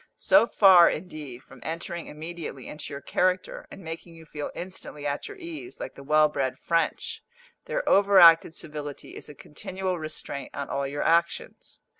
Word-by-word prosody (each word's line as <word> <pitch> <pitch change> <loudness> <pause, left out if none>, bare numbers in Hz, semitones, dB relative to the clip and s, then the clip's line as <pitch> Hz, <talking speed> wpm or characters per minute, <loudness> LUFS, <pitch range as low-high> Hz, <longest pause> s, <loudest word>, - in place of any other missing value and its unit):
So 290 -5 +5
far, 185 -6 +7
indeed, 150 -7 -7
from 135 - -16
entering 170 +1 -5
immediately 155 -3 -7
into 150 - -7
your 140 0 -6
character, 185 +5 -1
and 195 - -11
making 165 +1 -8
you 165 0 -13
feel 150 -1 -6
instantly 175 -5 -7
at 145 0 -2
your 410 - -10
ease, 340 0 -8
like - - -6
the - - -12
well 150 +2 +4
bred 135 -3 -2
French, 165 -1 -1 0.4
their - - -3
over 200 0 +5
acted 165 -2 +7
civility 150 -2 -6
is - - -8
a 150 - -11
continual 185 +5 -5
restraint 155 -3 -6
on 140 0 -4
all 140 0 -1
your 145 +1 -3
actions. 170 0 -1
165 Hz, 170 wpm, -26 LUFS, 145-185 Hz, 0.4 s, far